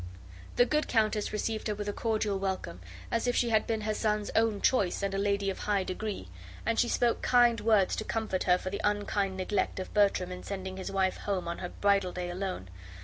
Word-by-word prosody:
The 245 - +5
good 300 +3 0
countess 215 -2 +1
received 215 +1 -2
her 210 - -1
with 205 0 -5
a 205 - -1
cordial 215 -3 0
welcome, 190 - -3 0.3
as 230 +1 0
if 245 - +1
she 240 - +2
had 220 -1 +2
been 220 -1 -1
her 215 0 -1
son's 210 -1 -1
own 225 -2 +2
choice 200 -6 +2
and 195 0 -1
a - - -1
lady 200 -1 +1
of - - -8
a - - -7
high 205 -2 +1
degree, 185 - -4 0.4
and 230 0 +1
she 240 - +3
spoke 240 -1 +1
kind 240 -2 +4
words 215 -4 +3
to - - -2
comfort 220 -5 -2
her 180 -1 +5
for 185 - -5
the 200 - -3
unkind 205 -2 0
neglect 190 +1 -1
of 185 - -6
Bertram 195 -3 +2
in 180 0 -6
sending 190 -1 -5
his 190 - -5
wife 190 -1 +1
home 195 -4 -2
on 170 - -4
her 180 - -4
bridal 200 -2 +1
day 180 -1 -4
alone. 180 - -4
205 Hz, 225 wpm, -30 LUFS, 190-220 Hz, 0.4 s, The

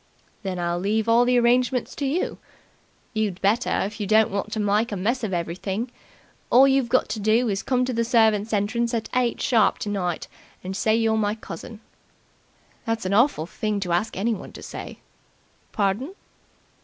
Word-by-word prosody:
"Then 190 -3 -4
I'll 175 0 -1
leave 215 +4 0
all 235 +2 +5
the 250 0 +3
arrangements 245 +1 +2
to 280 - -1
you." 310 +7 -2 0.7
"You'd 210 -4 -1
better, 215 +5 +1
if 210 +3 -5
you 205 - -2
don't 215 +1 +4
want 200 +2 -3
to 220 - -2
mike 210 +2 +1
a - - -2
mess 230 +7 -1
of 215 - -2
everything. 190 +7 -3 0.6
All 265 +3 +7
you've 270 -3 +2
got 255 +1 +2
to 220 - -3
do 220 +3 +2
is 195 -1 -1
to - - -8
come 255 -1 +1
to 255 - -2
the 230 0 +1
servants' 220 -2 +3
entrance 230 +3 0
at 225 - -3
eight 250 -2 +1
sharp 225 -5 +3
tonight 190 -5 -3 0.4
and 190 +1 -5
say 220 +2 +2
you're 225 -1 +2
my 210 -1 0
cousin." 215 +2 -9 1.0
"That's 225 -4 -2
an 185 - 0
awful 230 - +3
thing 210 +3 -2
to 180 -3 -3
ask 190 +5 -1
anyone 210 0 -2
to - - -10
say." - - -8 0.7
"Pardon?" 215 - -1
220 Hz, 180 wpm, -24 LUFS, 200-235 Hz, 1.0 s, All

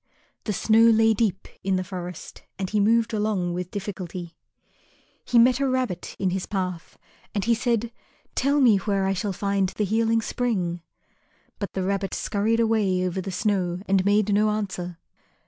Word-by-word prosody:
The 210 - -1
snow 220 +3 +3
lay 225 -1 +5
deep 205 -3 -1 0.2
in 195 0 +1
the 185 - 0
forest 180 -2 -8 0.2
and 190 -1 -2
he 210 - +2
moved 225 +2 +3
along 210 -5 0
with 180 0 -4
difficulty. 185 -4 -6 0.9
He 245 - +1
met 245 +2 +5
a 275 -1 +1
rabbit 255 -9 -2
in 190 -2 0
his 190 0 -3
path 180 -4 -4 0.4
and 200 -2 0
he 235 - +4
said, 230 0 0 0.4
"Tell 280 +2 +2
me 235 -7 +6
where 195 0 0
I 195 - +1
shall 200 +2 -2
find 200 0 0
the 210 +3 -2
Healing 225 +2 +1
Spring?" 185 -10 -1 0.8
But 200 -3 -4
the 190 - -2
rabbit 195 0 -1
scurried 215 +2 0
away 210 -5 +2
over 185 +1 -2
the 195 - -5
snow 185 -2 0
and 195 -1 +3
made 205 +1 +2
no 210 +1 +3
answer. 185 -5 -3
200 Hz, 170 wpm, -25 LUFS, 185-225 Hz, 0.9 s, me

